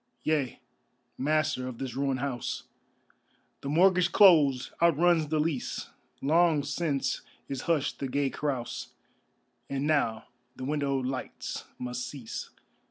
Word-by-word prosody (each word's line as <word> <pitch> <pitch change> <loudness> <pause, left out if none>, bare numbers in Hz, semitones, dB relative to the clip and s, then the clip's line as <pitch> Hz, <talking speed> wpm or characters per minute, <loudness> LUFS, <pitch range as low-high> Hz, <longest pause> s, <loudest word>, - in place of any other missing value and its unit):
Yea, 145 -6 0 0.6
Master 150 -2 0
of 125 -2 -6
this 130 -2 -4
ruined 135 0 -1
house, 135 -4 -3 1.0
The 140 - -4
mortgage 180 +2 +4
closed, 150 -11 +6
outruns 170 -1 +4
the 155 +1 0
lease; 150 -4 -2 0.3
Long 160 0 +4
since 145 -1 -1 0.3
is 135 -2 -4
hushed 150 -4 +1
the 135 - -2
gay 140 +1 0
carouse 135 -5 -3 0.8
And 140 +1 -1
now 140 -8 +1 0.3
the 130 - -6
windowed 140 -2 0
lights 130 0 -4
must 125 0 -4
cease. 130 -6 -6
140 Hz, 120 wpm, -29 LUFS, 130-155 Hz, 1.0 s, closed